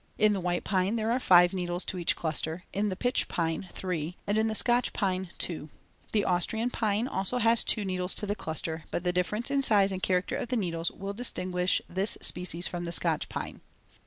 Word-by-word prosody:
In 215 0 +4
the 200 - -1
white 175 -1 -1
pine 190 +2 +1
there 225 0 0
are 250 - +2
five 175 -5 +6
needles 180 -1 -1
to 185 - -3
each 170 - +2
cluster, 160 +2 -2
in 205 +1 0
the 185 - -2
pitch 245 +5 +1
pine 165 +2 -2
three, 175 -2 -4
and 205 - 0
in 220 +1 +2
the 220 - -1
Scotch 240 +3 +2
pine 190 -3 -1
two. 155 -3 -2 0.4
The 210 -2 +1
Austrian 220 +7 0
pine 220 +1 0
also 195 -1 -1
has 230 -1 +4
two 210 - +2
needles 185 -1 -1
to - - -1
the 205 - 0
cluster, 160 -3 -4
but 175 - -3
the 180 -1 +1
difference 210 +8 0
in 280 0 +2
size 205 -6 +4
and 190 -1 -3
character 180 -1 +1
of - - -3
the 250 - 0
needles 170 -4 -1
will 195 +1 -6
distinguish 185 -5 -1
this 190 +4 -1
species 180 0 -2
from 175 -1 -3
the 170 - -3
Scotch 165 -2 +2
pine. - - -5
185 Hz, 215 wpm, -29 LUFS, 175-215 Hz, 0.4 s, five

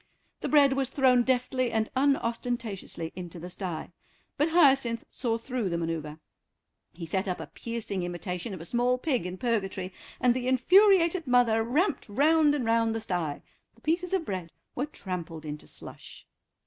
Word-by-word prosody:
The - - -3
bread 285 -3 +5
was 270 -1 0
thrown 260 -3 +4
deftly 255 0 0
and 220 -1 0
unostentatiously 235 -9 -1
into 175 -1 -7
the 180 +2 -7
stye, 175 -3 -5 0.4
but 295 +3 +1
Hyacinth 275 -8 +4
saw 230 -3 -1
through 240 -3 -3
the 170 - -1
manœuvre. 160 -2 -4 0.7
He 170 0 -8
set 190 +4 -1
up 180 - -2
a - - -5
piercing 225 -5 -4
imitation 180 +3 -4
of 170 - -9
a - - -8
small 245 +5 +1
pig 255 - -1
in 180 +1 -6
Purgatory, 195 -5 -2 0.3
and 245 -1 +4
the 250 0 -3
infuriated 345 - +4
mother 245 -3 +4
ramped 280 - 0
round 295 +5 +4
and 265 -5 -2
round 225 0 +2
the 225 - -2
stye; 170 -8 -3 0.3
the 230 - -24
pieces 345 +5 0
of 380 -4 0
bread 185 - -4 0.2
were 270 +4 -2
trampled 175 - -6
into 150 0 -7
slush. - - -11
235 Hz, 165 wpm, -28 LUFS, 180-270 Hz, 0.7 s, bread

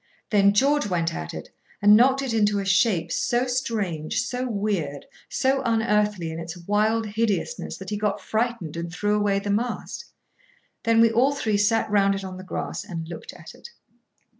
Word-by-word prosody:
Then 200 -1 +5
George 285 +3 +3
went 170 -3 -1
at 80 -1 -5
it, - - -8 0.3
and 205 +1 +7
knocked 265 +4 +4
it 255 -4 -2
into 210 -2 +2
a 200 - -2
shape, 195 -4 +2
so 245 0 +1
strange, 220 -8 -2
so 250 +1 -3
weird, 200 -10 -2 0.2
so 265 +1 +1
unearthly 210 -6 +1
in 160 - -6
its 165 +1 -7
wild 215 +5 +1
hideousness, 220 - -2
that - - -8
he 210 - -1
got 210 -1 -1
frightened 220 -8 -2
and 170 0 -5
threw 205 +4 -1
away 205 -1 +1
the 200 +1 -2
mast. 235 +4 -3 0.8
Then 230 0 +4
we 230 -1 +5
all 260 +5 +3
three 220 -6 0
sat 215 +2 +2
round 200 -1 +3
it 195 - -5
on 185 -1 -7
the 185 - -9
grass 185 - -4
and 170 -5 -6
looked 165 -1 -8
at - - -12
it. - - -13
210 Hz, 185 wpm, -24 LUFS, 185-230 Hz, 0.8 s, and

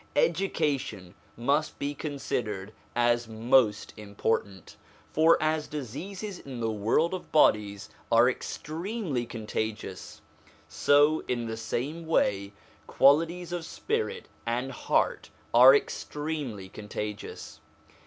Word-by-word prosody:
\Education 145 - 0 0.2
must 140 +6 0
be 145 +1 -2
considered 115 -9 -4 0.2
as 120 0 +2
most 110 -1 +2
important; 100 -2 -3 0.4
for 160 +2 +5
as 155 0 0
diseases 180 - -6
in 130 -3 -8
the 115 -1 0
world 115 - +1
of 185 - -6
bodies 105 -9 +3 0.2
are 115 +1 +6
extremely 155 - -3
con 115 -2 -7
tagious, 110 0 -4 0.5
so, 145 +2 +3
in 120 -2 -1
the 110 0 -4
same 145 +9 -4
way, 100 -10 +1 0.4
qualities 165 +5 +3
of 175 -2 -3
spirit 450 - -3 0.2
and 120 +3 -2
heart 125 - 0 0.2
are 130 +3 +9
extremely 145 -9 -3
contagious. 105 +1 -7
130 Hz, 105 wpm, -28 LUFS, 110-155 Hz, 0.5 s, are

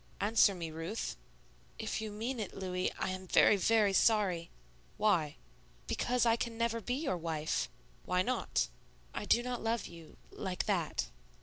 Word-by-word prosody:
"Answer 205 -1 +4
me, 165 -3 -5
Ruth." 165 +8 -4 0.6
"If 220 0 -3
you 215 -1 -4
mean 230 +4 -3
it, 210 - -4
Louis, 185 -1 -1
I - - -2
am 185 0 -5
very, 205 - +6
very 205 0 +3
sorry." 190 -6 +3 0.5
"Why?" 175 -8 +2 0.5
"Because 245 0 +1
I 230 -1 +5
can 230 -1 -3
never 230 0 0
be 245 +4 -1
your 270 - -1
wife." 160 -2 -1 0.4
"Why 180 0 +2
not?" 255 +4 0 0.4
"I - - -4
do 240 - +4
not 250 -1 -3
love 225 0 0
you 165 -2 -12
like 185 -2 -3
that." 165 - -1
205 Hz, 160 wpm, -33 LUFS, 180-230 Hz, 0.6 s, very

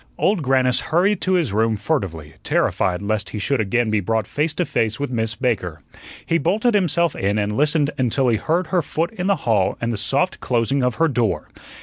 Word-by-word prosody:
Old 200 -3 +1
Grannis 130 -2 +2
hurried 185 +7 +1
to 185 - +1
his 165 - +1
room 110 +1 +2
furtively, 95 - -3
terrified 90 +1 0
lest 100 -2 -2
he 105 - -6
should 120 +4 0
again 110 +2 0
be 110 - +2
brought 110 +2 -1
face 150 +9 -1
to 180 - 0
face 110 -4 -1
with 145 -2 -3
Miss 115 -2 -2
Baker. 90 - -2 0.4
He 165 - +1
bolted 215 +9 +1
himself 170 -4 +1
in 100 +2 0
and 105 0 -1
listened 150 +1 +2
until 130 +1 +1
he 115 - +2
heard 170 - 0
her 180 - +4
foot 165 +2 -2
in 185 -4 -4
the 200 - +3
hall 105 -5 +2
and 115 0 -2
the - - -3
soft 140 - 0
closing 125 +2 0
of 125 -2 0
her 165 - +2
door. 120 -7 -1
125 Hz, 210 wpm, -21 LUFS, 110-160 Hz, 0.4 s, her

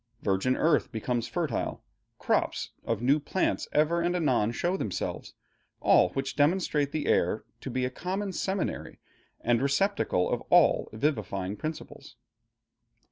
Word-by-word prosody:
Virgin 100 +6 +1
earth 160 -2 +2
becomes 115 +1 -2
fertile, 140 0 -2 0.3
crops - - 0
of - - -2
new 140 +4 +4
plants 185 +5 -1
ever 155 +3 +2
and 175 +1 0
anon 130 -10 +2
show 175 +9 -1
themselves, 110 - -4 0.4
all 90 - +5
which 135 0 -3
demonstrate 150 -1 +2
the 155 - -2
air - - +2 0.2
to - - -6
be 130 0 -1
a 125 - -3
common 190 +7 -3
seminary 190 +1 -3 0.4
and 120 0 +2
receptacle 140 - +1
of - - -1
all - - +4
vivifying 105 -7 -2
principles.... 155 +7 -7
140 Hz, 135 wpm, -28 LUFS, 120-170 Hz, 0.4 s, all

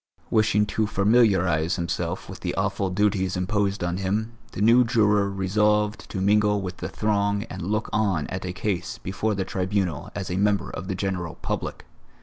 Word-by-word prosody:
Wishing 110 -1 +3
to 110 +1 -1
familiarize 95 -6 +3
himself 85 0 -3
with - - -9
the - - -3
awful 95 - 0
duties 95 -1 +1
imposed 100 +1 0
on 85 0 -1
him, 105 +4 -1 0.2
the - - -6
new 115 +4 +6
juror 105 -4 +3
resolved 105 +2 +1
to 95 - -4
mingle 105 +1 +3
with 90 -2 -5
the - - -5
throng 100 -1 0
and - - -6
look 105 +5 -1
on 100 -8 +1
at 95 - -5
a 90 - -3
case 95 -1 -3
before 105 +3 -2
the 95 -1 -1
Tribunal 95 -5 -1
as 95 -3 -4
a 90 - -1
member 100 0 +1
of 85 - -6
the 95 - -2
general 90 -3 -3
public. - - -3
100 Hz, 175 wpm, -25 LUFS, 95-105 Hz, 0.2 s, new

